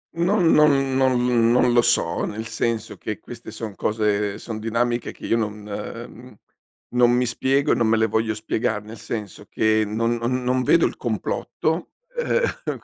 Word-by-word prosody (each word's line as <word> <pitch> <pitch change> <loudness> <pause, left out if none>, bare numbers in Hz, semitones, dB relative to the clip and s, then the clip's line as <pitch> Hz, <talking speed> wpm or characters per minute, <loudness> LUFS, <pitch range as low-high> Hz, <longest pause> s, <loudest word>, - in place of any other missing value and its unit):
Non 175 +3 +2
non 135 -3 +4
non 125 -3 +3
non 125 0 +4
lo 120 - +6
so, - - +1
nel 110 +2 -5
senso 115 0 -2
che 105 -2 -5
queste 120 0 -10
son 110 -1 -6
cose 105 -1 0
son 110 0 -6
dinamiche 120 +2 -1
che - - -11
io 115 - +2
non 105 -2 -4
ehm, 100 - -8 0.5
non 125 0 +4
mi 125 +1 +2
spiego 135 +4 +1
e - - +4
non 115 - +1
me 110 0 +3
le 110 - +3
voglio 110 0 0
spiegare, 110 -1 -2
nel 110 0 -10
senso 105 -2 -6
che 110 0 +2
non 115 +3 0
non 125 +2 -1
non 130 +1 +1
vedo 165 +6 +4
il - - -2
complotto, 145 - -2 0.2
ehm, - - -1
115 Hz, 175 wpm, -23 LUFS, 110-125 Hz, 0.5 s, lo